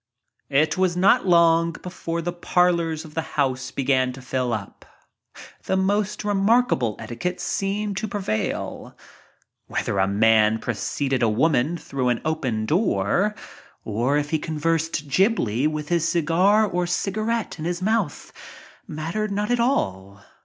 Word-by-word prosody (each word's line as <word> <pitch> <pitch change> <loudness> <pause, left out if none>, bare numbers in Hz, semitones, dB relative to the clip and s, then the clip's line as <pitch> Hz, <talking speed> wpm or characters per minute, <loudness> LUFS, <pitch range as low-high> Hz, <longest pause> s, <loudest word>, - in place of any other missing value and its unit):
It 150 +6 +2
was 180 -2 +1
not 195 +5 +4
long 170 -1 +4
before 170 -1 -5
the 175 +1 -2
parlors 170 -2 +1
of 155 - -13
the 160 - -1 0.2
house 130 -2 0
began 130 -2 +1
to 135 - -10
fill 130 -1 -1
up. 105 -3 -5 0.8
The 190 - 0
most 205 +2 0 1.1
seemed 200 0 -2
to 215 - -2
prevail. 190 - -3 0.7
Whether 100 - -2
a 95 - +3
man 110 +1 +4
preceeded 130 +4 -2
a 115 - +3
woman 145 +6 +1
through 135 -5 -2
an 120 - +1
open 130 -9 -1
door, 180 - +1 0.5
or 120 +7 0
if 145 0 -2
he 160 - +1
gibly 155 - 0
with 150 -1 -4
his 170 -1 +1
cigar 180 +6 +3
or 180 -3 -1
cigarette 215 +4 -2
in 155 - -4
his 175 0 -2
mouth, 215 -7 -1 0.5
mat 155 +2 -5
tered 215 0 -1
not 205 +3 -2
at 245 - +2
all. 100 - -1
165 Hz, 135 wpm, -23 LUFS, 130-190 Hz, 1.1 s, not